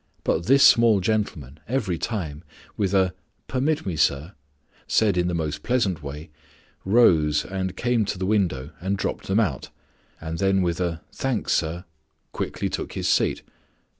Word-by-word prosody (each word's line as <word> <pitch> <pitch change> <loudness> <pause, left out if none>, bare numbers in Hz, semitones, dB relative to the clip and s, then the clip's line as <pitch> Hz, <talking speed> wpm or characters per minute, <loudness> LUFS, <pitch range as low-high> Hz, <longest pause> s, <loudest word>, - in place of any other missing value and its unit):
But 85 - 0
this 135 +2 +6
small 115 -3 +6
gentleman, 90 - -2
every 105 -9 -1
time, 85 -9 -4 0.3
with 100 -3 0
a 95 -2 +3 0.3
'Permit 145 +4 0
me, 90 -4 -2
sir,' 75 +3 +1 0.5
said 105 -4 +3
in 90 0 +1
the 90 - -1
most 75 -2 -3
pleasant 105 -8 0
way, 75 +3 -8 0.5
rose 80 -9 +4
and 95 -1 -4
came 120 -3 +1
to 100 - -3
the 95 - -2
window 85 -9 0
and 95 +2 -1
dropped - - -3
them 95 +3 +2
out, 80 - -1 0.5
and 80 0 -5
then 95 -1 +2
with 85 0 -1
a 85 -2 -2
'Thanks, 130 -5 -1
sir,' 85 +3 -1 0.5
quietly - - -3
took - - -4
his - - -2
seat. - - +1
95 Hz, 160 wpm, -24 LUFS, 80-105 Hz, 0.5 s, this